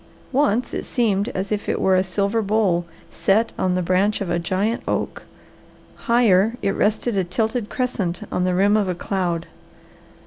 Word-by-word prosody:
Once 255 -3 +1
it - - -3
seemed 210 -5 0
as 190 +2 -3
if 210 -1 -2
it - - 0
were 190 - +3
a 185 - +3
silver 200 +4 0
bowl 195 -5 +1 0.2
set 220 +4 +1
on 185 -1 0
the 180 - 0
branch 190 +4 +1
of 190 -3 -3
a 170 - +1
giant 190 +7 -1
oak; - - -2 0.9
higher, 225 -2 +4
it 195 - +2
rested 215 +3 0
a 190 - +2
tilted 220 +5 -2
crescent 200 -8 -2
on 180 - 0
the 180 0 +1
rim 200 +3 +4
of 205 -3 +1
a 180 - -1
cloud. 175 -2 -2
200 Hz, 175 wpm, -22 LUFS, 185-220 Hz, 0.9 s, higher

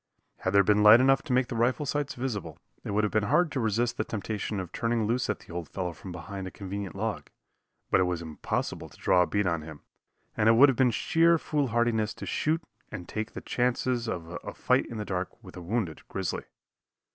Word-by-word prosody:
Had 95 - -2
there 100 0 +6
been 105 0 +3
light 105 +2 +9
enough 135 +1 +4
to 150 - -7
make 125 0 +3
the 120 - -4
rifle 125 +6 +1
sights 145 0 -2
visible, 120 -6 -4 0.3
it - - -6
would 105 +1 +1
have 105 - 0
been 110 -1 +2
hard 165 +2 +3
to 135 - -2
resist 115 +1 0
the - - +1
temptation 105 -1 -3
of 90 -2 -6
turning 115 -1 0
loose 120 +3 0
at 110 - -2
the - - -12
old 85 -2 -5
fellow 90 -3 -3
from 85 +4 -10
behind 95 +3 -6
a - - -4
convenient 100 -1 -6
log; - - -3 0.6
but - - +5
it 95 - +3
was 90 -1 -1
impossible 80 -2 -4
to - - -18
draw 95 -2 +3
a 90 - +2
bead 105 -1 0
on 85 -3 0
him, 75 -1 -10 0.5
and 110 +1 +3
it - - +7
would 135 +5 +7
have 135 - +1
been 130 0 +4
sheer 165 +8 +3
foolhardiness 120 -8 0
to - - -7
shoot 160 +2 0 0.3
and 90 -5 -7
take 110 +1 -4
the - - -6
chances 125 -1 0
of 90 -3 -5
a - - -7
fight - - +2
in 115 - -7
the 105 - -3
dark 95 +5 -4
with 90 -3 -12
a 90 - -7
wounded 90 -3 -2
grizzly. 95 -3 -3
110 Hz, 225 wpm, -28 LUFS, 95-120 Hz, 0.6 s, light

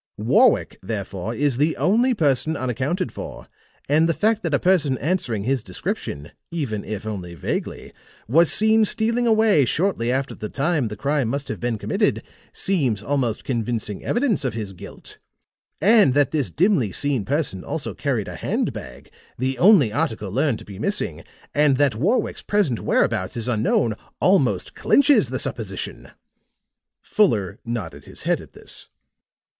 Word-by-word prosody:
Warwick, - - +3
therefore, 100 +1 -4
is 140 -2 0
the 150 +3 +1
only 240 +6 +2
person 155 - +1
unaccounted 130 - -2
for; - - -8 0.4
and 155 +3 +3
the 165 - +1
fact 220 +1 +1
that 170 - -2
a - - +4
person 155 -8 +2
answering 125 - -1
his 130 +2 0
description, 90 -6 -5 0.2
even 130 -11 -3
if 105 0 -6
only 90 -5 -5
vaguely, 75 - -4 0.3
was 160 +8 +5
seen 220 +1 +5
stealing 230 +3 +1
away 220 -8 +4
shortly 135 -4 0
after 135 +1 -1
the 105 - -6
time 145 -2 0
the 105 - -6
crime 140 -2 0
must 140 +4 -3
have - - -4
been 120 -2 -1
committed, - - 0 0.3
seems 130 - 0
almost 125 -5 -1
convincing 115 -4 -3
evidence 240 - 0
of 125 -5 -2
his 105 -4 -5
guilt. 90 - -12 0.6
And 205 - +5
that 145 -3 +3
this 150 -5 0
dimly 160 - +2
seen 140 0 -1
person 135 - -2
also - - -4
carried - - -2
a - - -6
hand - - -1
bag, - - -10 0.3
the 130 +1 -2
only 175 - +6
article 110 - -1
learned 135 +1 +1
to - - -13
be 100 -2 -10
missing, - - -2 0.3
and 145 -2 +3
that 145 -3 +3
Warwick's 180 - 0
present 195 - 0
whereabouts - - 0
is 115 - -3
unknown, 115 -1 +1 0.3
almost 130 - +2
clinches 285 +1 +4
the - - -2
supposition." - - -5 0.9
Fuller 105 - +1
nodded 90 -12 -5
his - - -9
head - - +1
at - - -15
this. - - -6
135 Hz, 155 wpm, -22 LUFS, 110-170 Hz, 0.9 s, only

